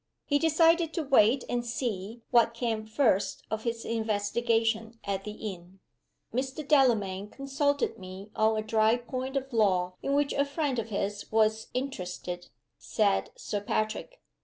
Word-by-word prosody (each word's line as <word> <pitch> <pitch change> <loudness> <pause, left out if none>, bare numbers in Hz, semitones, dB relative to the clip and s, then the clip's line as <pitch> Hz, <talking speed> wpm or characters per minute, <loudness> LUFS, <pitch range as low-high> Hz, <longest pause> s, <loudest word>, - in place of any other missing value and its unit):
He 285 0 +2
decided 325 +1 +3
to 330 - 0
wait 260 -2 +4
and 240 0 -1
see 230 -2 -4
what 230 -1 +4
came 225 -2 -2
first 220 -4 +1
of 220 +1 -3
his 230 -1 -2
investigation 225 +1 0
at 195 0 -3
the 210 - -5 0.2
inn. 180 +2 -16 0.5
"Mr. 265 +4 -3
Delamayn 210 -9 +3
consulted 280 +2 -1
me 190 +2 -9
on 220 0 +3
a 215 - -1
dry 220 +1 +3
point 255 +2 -4
of 270 -1 -4
law, 185 -5 +2
in 275 - 0
which 290 0 +2
a 280 - +2
friend 280 -3 -1
of 225 0 -4
his 205 0 -3
was 220 0 +2
interested," 180 -8 -4 0.3
said 95 0 +1
Sir 205 - -4
Patrick. 215 - -2
225 Hz, 150 wpm, -29 LUFS, 205-270 Hz, 0.5 s, wait